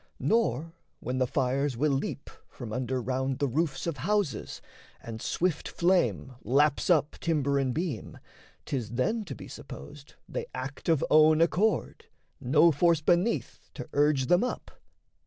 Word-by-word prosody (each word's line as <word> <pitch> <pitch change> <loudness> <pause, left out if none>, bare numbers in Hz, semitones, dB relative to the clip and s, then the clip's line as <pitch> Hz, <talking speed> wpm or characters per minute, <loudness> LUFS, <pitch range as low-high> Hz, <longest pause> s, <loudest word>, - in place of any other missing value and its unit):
Nor, 165 - 0 0.3
when 130 +1 -3
the 130 - +2
fires 135 0 0
will 150 +3 +2
leap 140 +1 -3 0.2
from 115 -4 -8
under 130 +1 -2
round 130 +1 -2
The 140 0 0
roofs 140 +1 -1
of 165 -4 -3
houses, 175 - -1 0.4
and 115 -1 -8
swift 175 -3 -1
flame 175 -6 +1
laps 140 - +2
up 155 -4 +3
Timber 140 -4 +1
and 135 -2 0
beam, 165 +3 -4 0.5
'tis 120 -4 -3
then 215 - 0
to - - -6
be - - -10
supposed 135 - -11
They - - -4
act 130 +5 -5
of 160 -4 +3
own 155 0 +6
accord, 185 +6 +1 0.3
no 150 +6 +4
force 165 +2 +3
beneath 175 +8 0
To - - -7
urge 145 -2 +3
them 175 - +3
up. 250 - -4
145 Hz, 150 wpm, -28 LUFS, 130-170 Hz, 0.5 s, own